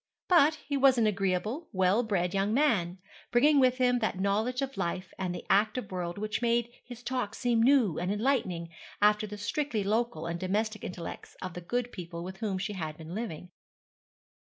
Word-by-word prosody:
But 320 -4 +5
he 285 -1 -1
was 265 -1 +5
an 230 - +3
agreeable, 205 - -1
well 190 +2 +3
bred 185 -6 -1
young 200 +3 +1
man, 200 - +2 0.3
bringing 285 +4 +5
with 255 -1 +4
him 250 -1 +3
that 220 -4 -1
knowledge 220 +7 0
of 270 0 -4
life 185 0 -3
and 180 -2 -2
the - - -7
active 215 +2 +1
world 175 -1 -3
which 215 +1 -2
made 235 0 +1
his 245 -1 -11
talk 245 -4 -2
seem 240 -2 +1
new 240 - +4
and 180 +2 -1
enlightening 205 -7 0 0.3
after 210 +1 +3
the 210 0 -7
strictly 230 +1 -1
local 215 -5 0
and 170 0 -3
domestic 215 +3 -1
intellects 175 -2 -7
of 185 -2 -6
the 180 - -6
good 245 +7 -2
people 170 -2 -7
with 190 +1 -7
whom 205 -3 -2
she 200 +3 -3
had 155 -5 -5
been 160 +1 -9
living. 180 -5 -5
210 Hz, 185 wpm, -29 LUFS, 185-245 Hz, 0.3 s, But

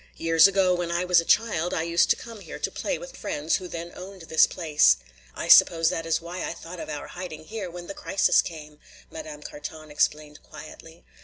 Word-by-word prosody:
Years 165 +2 +5
ago 190 -2 +2
when 175 -1 -2
I 170 +1 -1
was 180 -2 +4
a - - -10
child 180 -6 +1
I 160 - -1
used 170 +1 +2
to - - +5
come 230 -3 -11
here - - -9
to - - -3
play - - -3
with - - -11
friends 150 +2 -1
who 185 - -8
then 170 0 -7
owned 185 0 -10
this 160 -1 +4
place. 150 - +3 0.4
I - - -5
suppose 165 -1 +6
that 165 0 -4
is 165 - +1
why 175 +2 -7
I - - -3
thought 175 +1 -10
of - - -7
our 150 -1 -5
hiding 180 -4 -8
here 210 -2 -6
when 175 0 -9
the 195 - -7
crisis 195 - +2
came," 150 -2 -10 0.3
Madame 310 -1 -9
Carton 225 - -9
explained 150 0 -1
quietly. 165 +1 -13
170 Hz, 215 wpm, -25 LUFS, 160-185 Hz, 0.4 s, suppose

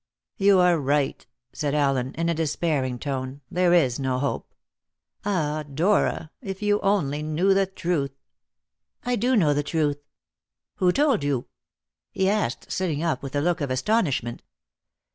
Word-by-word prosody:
"You 200 0 +5
are 180 -2 +4
right," 140 0 0 0.3
said 145 -1 -1
Allen 135 -3 +1
in 165 +1 -1
a 170 - +2
despairing 150 -5 -1
tone; 135 +1 -4
"there 180 0 +2
is 145 -9 +3
no 130 -2 0
hope. 140 +2 -3 0.7
Ah, 155 -6 -1
Dora, 165 0 +1
if 195 -3 -6
you 205 0 +2
only 160 -8 +1
knew 155 +6 +2
the 195 0 +2
truth!" 170 -8 -2 0.9
"I 245 0 0
do 250 +2 +1
know 160 -9 +4
the 145 - +1
truth." 145 -1 0 0.8
"Who 180 -1 +3
told 275 - +2
you?" 140 -4 0 0.6
he 190 - 0
asked, 200 - -1
sitting 165 -5 -1
up 160 -7 0
with 135 0 -6
a 145 - +2
look 175 +1 0
of 140 - -1
astonishment. 130 - 0
155 Hz, 150 wpm, -25 LUFS, 140-190 Hz, 0.9 s, You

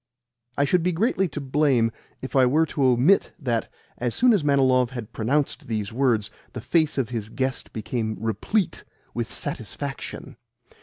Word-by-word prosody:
I 140 - +3
should 180 +5 +2
be 180 +1 +1
greatly 195 +1 +1
to 155 - -6
blame 135 -4 +2 0.3
if 130 - -6
I 130 - +6
were 155 +6 +3
to 145 -3 -2
omit 130 +10 +4
that, 120 -7 -2 0.3
as 120 -1 -1
soon 250 -1 +5
as 195 -8 +2
Manilov 130 -3 +3
had 120 -3 -7
pronounced 135 +6 0
these 110 -2 -3
words, 115 -5 +1 0.2
the 125 - -5
face 155 +3 +1
of 130 -5 0
his 110 -4 -4
guest 130 +2 -3
became 110 0 -3
replete 115 - -1 0.3
with - - -3
satisfaction. - - -6
130 Hz, 160 wpm, -24 LUFS, 115-150 Hz, 0.3 s, I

